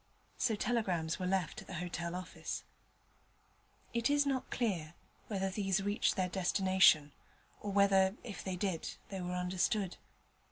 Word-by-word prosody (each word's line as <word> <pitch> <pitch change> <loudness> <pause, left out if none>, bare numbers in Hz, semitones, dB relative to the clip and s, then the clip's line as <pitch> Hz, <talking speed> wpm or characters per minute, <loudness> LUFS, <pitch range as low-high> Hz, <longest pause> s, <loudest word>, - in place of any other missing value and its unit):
So 230 -4 +2
telegrams 185 -8 0
were 185 - -1
left 185 -3 0
at - - -14
the 185 - -6
hotel 175 0 -3
office. 185 0 -5 1.3
It 235 +1 +1
is 290 0 +4
not 270 -2 -1
clear 175 -9 -1 0.3
whether 195 -2 -1
these 195 -1 0
reached 205 +1 +1
their 185 -2 +1
destination, 185 -4 +4 0.5
or 205 - -4
whether, 195 -1 +4
if 215 -6 -7
they 190 -1 -2
did, 180 -3 -2
they 195 -2 -4
were 180 0 -3
understood. 180 +2 0
190 Hz, 145 wpm, -34 LUFS, 180-205 Hz, 1.3 s, is